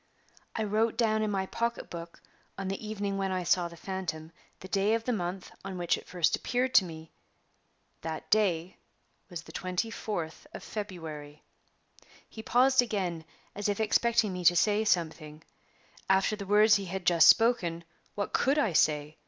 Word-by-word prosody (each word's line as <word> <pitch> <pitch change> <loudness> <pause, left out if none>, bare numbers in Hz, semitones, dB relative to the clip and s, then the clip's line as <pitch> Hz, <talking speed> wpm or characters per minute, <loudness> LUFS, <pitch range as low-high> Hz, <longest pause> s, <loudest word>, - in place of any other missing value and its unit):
I 220 - -1
wrote 220 +2 0
down 220 -2 +2
in 215 - 0
my 195 -2 -1
pocketbook, 175 -7 -5 0.3
on 195 0 -4
the 195 +3 -5
evening 200 -2 -3
when 195 -1 -1
I 185 -1 -1
saw 175 0 +2
the 170 0 -12
phantom, 170 -4 -5 0.3
the 185 - -10
day 200 +3 +2
of 230 - -3
the 250 - -1
month 180 -2 -4
on 190 -1 -6
which 175 -1 +1
it - - -11
first 175 -3 +1
appeared 255 +1 -1
to 190 - +6
me. 160 -2 -10 0.9
That 160 -1 -5
day 185 -5 +1 0.5
was 170 -3 -7
the - - -13
24th 185 -3 -4
of - - -8
February." 160 -8 -7 0.8
He 220 - -9
paused 255 +3 +4
again, 185 -8 -3 0.3
as 205 0 -2
if 205 - -1
expecting 220 -1 +2
me 180 0 -5
to 175 - +7
say 210 +4 +3
something. 160 -4 -1 0.7
After 190 +2 +3
the 200 -2 -8
words 210 +1 +5
he 200 - -5
had 190 0 -5
just 170 -2 +6
spoken, 180 -8 +4 0.3
what 200 - -3
could 275 +3 +2
I 225 - +1
say? 150 -1 +1
190 Hz, 170 wpm, -29 LUFS, 170-215 Hz, 0.9 s, to